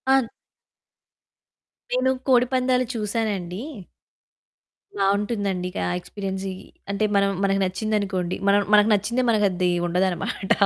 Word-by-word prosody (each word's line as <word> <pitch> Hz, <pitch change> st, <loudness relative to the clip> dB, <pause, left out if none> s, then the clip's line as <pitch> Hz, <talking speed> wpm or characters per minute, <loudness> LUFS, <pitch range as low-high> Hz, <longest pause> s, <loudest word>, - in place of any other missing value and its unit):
On 260 Hz, -4 st, +2 dB, 1.6 s
నేను 255 Hz, +1 st, +2 dB, 0.2 s
కోడిపందాలు 255 Hz, 0 st, +3 dB
చూసానండి. 210 Hz, -4 st, -2 dB, 1.4 s
బాగుంటుందండి. 200 Hz, -2 st, 0 dB
కా -, -, -1 dB, 0.2 s
ఎక్స్‌పీరియన్స్‌యి. 190 Hz, 0 st, -5 dB, 0.4 s
అంటే 215 Hz, +2 st, 0 dB
మనం 200 Hz, 0 st, +4 dB
మనకి 195 Hz, 0 st, +2 dB
నచ్చిందనుకోండి 190 Hz, -2 st, -1 dB
మనం 200 Hz, +1 st, +5 dB
మనకు 210 Hz, +1 st, +6 dB
నచ్చిందే 235 Hz, +5 st, +1 dB
మన 220 Hz, -, +4 dB
అది 180 Hz, 0 st, 0 dB, 0.2 s
ఉండదన్నమాట. 180 Hz, +1 st, -1 dB
200 Hz, 95 wpm, -24 LUFS, 190-225 Hz, 1.6 s, మనకు